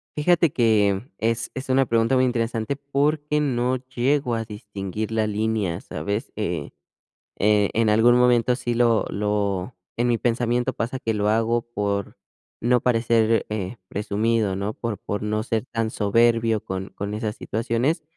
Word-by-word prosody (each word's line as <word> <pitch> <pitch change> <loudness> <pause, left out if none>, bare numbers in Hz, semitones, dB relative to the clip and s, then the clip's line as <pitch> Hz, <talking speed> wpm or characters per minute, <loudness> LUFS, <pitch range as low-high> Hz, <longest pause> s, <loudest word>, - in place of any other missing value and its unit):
Fíjate 170 +1 +3
que 105 -4 +2 0.2
es 115 +1 -1
es 130 +1 -7
una 135 +1 +4
pregunta 115 +2 +2
muy 130 - +4
interesante 115 0 -1
porque 145 +2 0
no 125 -3 +1
llego 130 +1 0
a 115 0 -2
distinguir 105 0 -5
la 110 -1 +1
línea, 105 -4 -1
¿sabes? 105 +5 -4
Eh, 85 -8 -3 0.7
eh, 105 0 +3
en 110 -1 +3
algún 115 +3 +5
momento 125 0 +3
sí, 125 -2 -2
lo 115 -2 +3
lo 100 0 -1 0.2
en 120 +1 +2
mi 120 - +3
pensamiento 120 +2 0
pasa 120 +3 -3
que 115 -4 -1
lo 105 0 0
hago 115 +2 +2
por, 100 -1 -2 0.5
no 125 0 +3
parecer, 115 -2 +2
eh, 105 0 -3
presumido, 105 0 0
¿no? 100 +2 -2
Por 115 -2 -4
por 105 - -4
no 105 0 -1
ser 115 0 -2
tan 115 -3 -2
soberbio 115 +1 +2
con 95 +1 -4
con 100 +1 -5
esas 105 0 -3
situaciones, 120 +8 -1
115 Hz, 155 wpm, -23 LUFS, 105-125 Hz, 0.7 s, algún